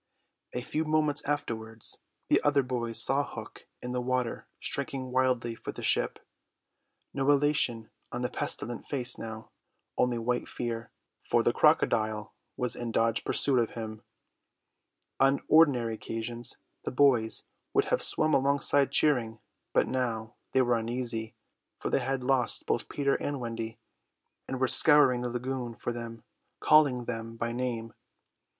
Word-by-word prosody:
A 125 - -3
few 155 +5 -1
moments 155 -1 +1
afterwards 115 -6 -4 0.3
the - - +3
other 145 -1 +3
boys 120 -2 -1
saw 140 +1 +2
Hook - - -10 0.2
in 125 - -4
the 125 0 -1
water 125 -1 -2
striking 130 -2 -4
wildly 125 -2 +1
for - - -7
the - - -9
ship; - - +2 1.0
no 135 0 0
elation 145 -6 +2 0.2
on 120 +1 -3
the 125 - 0
pestilent 120 +1 -3
face 125 -4 +1
now, 110 0 -8 0.5
only 125 -1 +2
white 120 +1 -1
fear, 115 -1 -4 0.3
for - - +2
the - - +2
crocodile 110 -2 +2 0.2
was 125 -2 +2
in 120 -1 -4
dogged 115 0 +1
pursuit 135 -3 +2
of 115 - -1
him. 110 -2 -6 1.2
On 135 +1 +4
ordinary 135 -8 +4
occasions 115 +2 -3 0.3
the - - -2
boys 125 -5 +3 0.3
would - - +2
have - - 0
swum 155 0 +1
alongside 140 0 +3
cheering; 120 -7 +2 0.3
but - - +2
now 115 -3 -2 0.2
they 130 - +4
were 120 -1 +2
uneasy, 115 -1 -3 0.4
for - - -4
they - - +3
had 135 0 -2
lost 130 -1 +1
both - - -1
Peter 140 -1 0
and 145 -1 -3
Wendy, 115 -2 -5 0.7
and 130 - -4
were 130 - +2
scouring 135 -4 +6
the 125 - -2
lagoon 125 -1 -4
for 120 - -4
them, 115 -1 -7 0.4
calling 140 -6 +4
them 115 -1 -5
by 115 0 -2
name. 120 -2 -3
125 Hz, 145 wpm, -29 LUFS, 115-135 Hz, 1.2 s, scouring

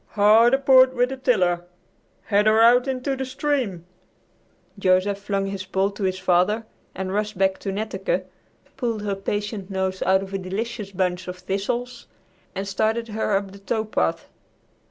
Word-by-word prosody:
"Hard 220 +4 +5
aport 260 -1 +5
with 245 0 +2
the 265 - -5
tiller! 180 -9 +1 0.6
Head 205 0 +2
her 215 +1 +5
out 245 +3 +6
into 265 +1 -2
the 265 - -3
stream!" 260 - -2 0.9
Joseph 190 +1 +2
flung 200 -1 -2
his 195 -1 -4
pole 190 +1 0
to 205 - -10
his 185 -1 0
father 185 +4 +1 0.3
and 190 0 -4
rushed 210 0 -2
back 190 0 +1
to 195 - -4
Netteke, 190 -2 -2 0.5
pulled 230 -5 -2
her 205 -1 -1
patient 205 0 -4
nose 190 -1 -2
out 190 0 +3
of 195 0 -10
a 195 - -1
delicious 205 +3 -4
bunch 185 -1 -1
of 180 0 -6
thistles 200 +7 -3 0.5
and 195 +1 -3
started 220 +4 -1
her 215 -1 -1
up 195 -1 -5
the 200 - -13
tow 220 +2 -2
path. 80 - -1
200 Hz, 165 wpm, -23 LUFS, 190-230 Hz, 0.9 s, out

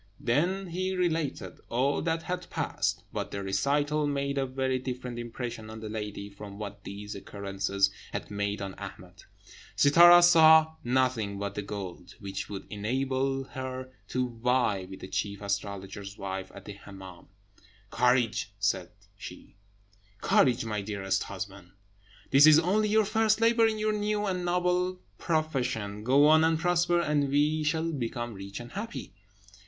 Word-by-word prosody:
He - - -17
then 175 +10 +1 0.3
related 165 -5 -2
all 130 +4 +1
that 165 0 -1
had 180 +1 -4
passed. - - -2
But - - -3
the 100 - -5
recital 145 +10 +1
made 140 -1 -1
a 135 - 0
very 130 0 -1
different 125 -1 -5
impression 120 -2 -6
on 110 0 -8
the 110 -1 -7
lady 105 -2 -5
from 100 0 -10
what 100 -1 -7
these 105 +1 -7
occurrences 100 0 -1 0.2
had - - -5
made 100 0 -2
on 95 -1 -5
Ahmed. - - -10 0.5
Sittâra 175 +4 +8
saw 160 -2 +7
nothing 120 -5 0
but 100 0 -4
the 105 - -3
gold, 95 -3 -7
which 100 -2 -5
would 100 -2 -6
enable 130 +5 -1
her 130 -1 -6 0.2
to 125 +1 -1
vie 120 -7 +1
with 95 - -10
the - - -7
chief 100 +2 -3
astrologer's 100 0 -4
wife 95 -1 -5
at 100 - -11
the 105 - -7
Hemmâm. 95 -3 -12 0.6
"Courage!" 125 -2 +2
she - - -4
said, - - 0 1.3
"courage! 120 -3 +3
my 105 -2 -2
dearest 100 -1 -2
husband. 95 -1 -8 0.6
This 140 +3 +8
is 155 -1 +8
only 200 +6 +2
your 215 0 +4
first 220 +1 +2
labour 230 0 +4
in 220 -1 -1
your 215 0 0
new 210 0 -1
and 185 -2 -2
noble 180 +1 0 0.2
profession. 130 - -1
Go 135 +5 +5
on 155 +1 +6
and 160 0 +3
prosper, 175 +1 +2
and 150 -4 +1
we 150 +3 +2
shall 160 +2 0
become 120 -4 -4
rich 100 0 -8
and 120 0 -9
happy." 220 - -6
130 Hz, 155 wpm, -28 LUFS, 100-160 Hz, 1.3 s, Sittâra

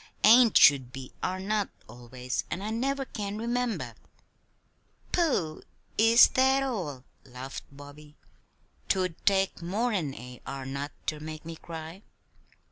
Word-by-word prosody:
"'Ain't' 230 +1 +7
should 130 -4 +6
be 130 -1 -8
'are 185 +1 -2
not' 205 +1 -1 0.2
always, 125 +1 -5
and 175 +5 -4
I 215 - -3
never 270 +4 -1
can 205 -4 -5
remember." 235 +1 -2 1.2
"Pooh! 255 - 0 0.3
Is 225 +2 +7
that 265 +1 +3
all?" 175 - -4 0.2
laughed 130 +1 -8
Bobby. 145 +1 -13 0.7
"'Twould 185 -3 +1
take 195 -2 +2
more'n 185 - -1
a 125 +1 -10
'are 135 -1 -5
not' 140 +2 -4
ter 155 - -2
make 155 +1 -8
me 165 0 -6
cry." 165 +3 -9
170 Hz, 125 wpm, -28 LUFS, 140-220 Hz, 1.2 s, Ain't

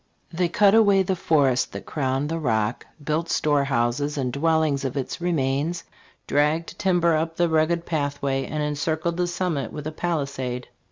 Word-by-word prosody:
"They 175 +1 +1
cut 200 +3 +4
away 200 -3 +5
the 190 0 -1
forest 140 -7 +2
that - - -7
crowned 135 0 -1
the, 165 0 -2
Rock, 110 -5 -1 0.2
built 155 +3 -1
storehouses 140 -1 +1
and 125 -3 -1
dwellings 155 -1 +1
of 135 +1 -3
its 135 +5 -4
remains, 160 0 0 0.4
dragged' 150 +3 0
timber 175 -4 +3
up 165 +1 -1
the: 175 - +3
rugged 165 +1 +1
pathway, 145 -3 -1
and 150 -1 -2
encircled 155 +3 -1
the 180 0 +1
summit 175 -5 -2
with 150 -1 -7
a' 155 - -3
palisade." 140 -7 -3
155 Hz, 160 wpm, -24 LUFS, 140-170 Hz, 0.4 s, away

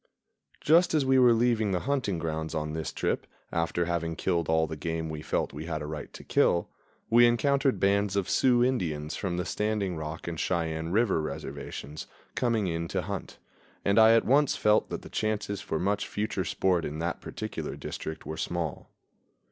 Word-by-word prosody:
Just 165 +2 +4
as 145 -3 +2
we 130 0 +4
were 125 -1 +7
leaving 115 -3 +2
the 90 - 0
hunting 130 -9 0
grounds 80 0 -3
on 75 0 -2
this 80 0 -3
trip, - - -2 0.2
after 85 +1 0
having 85 -1 -1
killed 85 -3 0
all 80 0 +3
the 80 0 -5
game 80 +1 -3
we 75 -1 -5
felt - - -1
we 75 +2 -6
had 80 -2 -3
a - - -5
right 75 0 -6
to - - -10
kill, 85 0 +2 0.4
we 120 +1 +7
encountered 135 +3 +2
bands 100 0 +2
of 100 -2 0
Sioux 120 -2 +4
Indians 80 -12 -1
from 90 -3 -2
the 90 - -1
Standing 105 -4 -1
Rock 80 +1 -6
and 85 -1 -4
Cheyenne 80 -2 -1
River 100 -3 +2
reservations 75 0 -6 0.3
coming 115 -4 +1
in 85 -1 -2
to 95 +1 -2
hunt, 100 +1 -5 0.5
and 100 +2 +4
I 110 0 +8
at 115 - +3
once 140 +3 +4
felt 105 0 +3
that - - -5
the - - -9
chances 105 -2 -2
for 80 - -2
much 100 +4 0
future 105 -2 -2
sport 90 -3 +1
in 75 - -4
that 85 +1 -3
particular - - -5
district 80 - -6
were 80 - -5
small. 85 -3 -3
90 Hz, 190 wpm, -28 LUFS, 80-110 Hz, 0.5 s, I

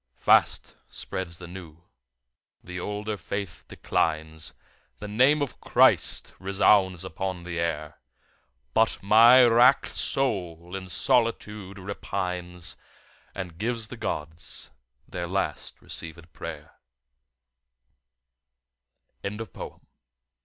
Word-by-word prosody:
Fast - - +3
spreads 85 -3 -5
the 90 - -9
new; 85 -2 -11 0.8
the 90 0 -6
older 105 +2 -3
faith 100 0 -5
declines. 80 0 -1 0.4
The 105 - -7
name 130 +8 +4
of 140 - -6
Christ - - +3
resounds 95 -1 +3
upon 95 +1 -4
the 85 -1 -4
air. 75 -2 -3 0.7
But 110 0 +3
my 115 +5 +8
wrack'd 120 +3 +6
soul 90 -9 -1
in 95 -1 -6
solitude 105 -2 +1
repines 90 -2 -3 0.6
And 90 -3 -6
gives 115 0 -1
the - - -7
Gods 80 - -4 0.4
their 85 -1 -4
last 95 +2 -3
receivèd 80 +1 -7
pray'r. - - -8 2.4
Retrieved - - -49
from 100 +1 -4 0.3
"https://en. - - -25
95 Hz, 100 wpm, -26 LUFS, 85-105 Hz, 2.4 s, my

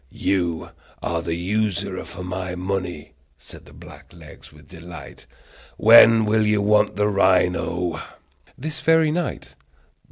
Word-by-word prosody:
"You 85 -1 -2 0.3
are 85 -1 -2
the 85 0 -3
usurer 100 +1 -2
for 90 - -9
my 90 0 -5
money!" 90 -5 -5 0.2
said - - -15
black - - -15
legs 80 -4 -15
with 75 -1 -19
delight. 85 -1 -12 0.5
"When 115 0 +7
will 110 +1 +2
you 105 0 +2
want 105 +1 +2
the 105 +1 +1
rhino?" 90 -3 0 0.6
"This 155 +3 -6
very 160 -1 +3
night." 175 +1 -4
95 Hz, 125 wpm, -22 LUFS, 85-105 Hz, 0.6 s, When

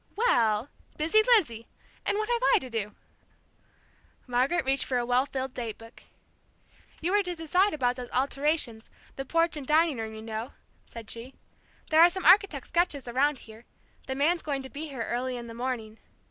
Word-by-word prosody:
"Well 235 - +2 0.3
busy 325 +8 +4 0.2
Lizzie! 230 - -3 0.4
And 405 - +1
what 430 0 -1
have 480 0 0
I - - +6
to 260 -10 -6
do?" 210 -2 -3 1.3
Margaret 260 +5 +1
reached 270 +1 +2
for 255 - -1
a 240 - 0
well 250 +3 +2
filled 265 -1 -4
date 230 -3 -5
book. 225 +1 -15 1.0
"You 345 +3 0
were 410 +1 +4
to 360 -2 -4
decide 360 +5 +2
about 250 -3 0
those 245 -1 -7
alterations, 275 -3 -1 0.3
the 270 - -5
porch 330 +3 +1
and 285 -3 -7
dining 310 -3 +3
room, 220 0 -5
you 220 - -9
know," 225 +2 -5 0.3
said 230 -2 -10
she. 235 +3 -8 0.6
"There 315 +1 +6
are 345 - +9
some 375 +1 -5
architect's 365 -7 +4
sketches 325 -7 0
around 270 +3 +1
here; 220 +1 -14 0.4
the 265 - -3
man's 325 +5 +2
going 280 -3 -3
to 265 - -10
be 305 +2 -6
here 265 -6 -5
early 250 +2 -2
in 240 - -7
the 230 - -9
morning. 230 -3 -4
265 Hz, 185 wpm, -28 LUFS, 235-325 Hz, 1.3 s, are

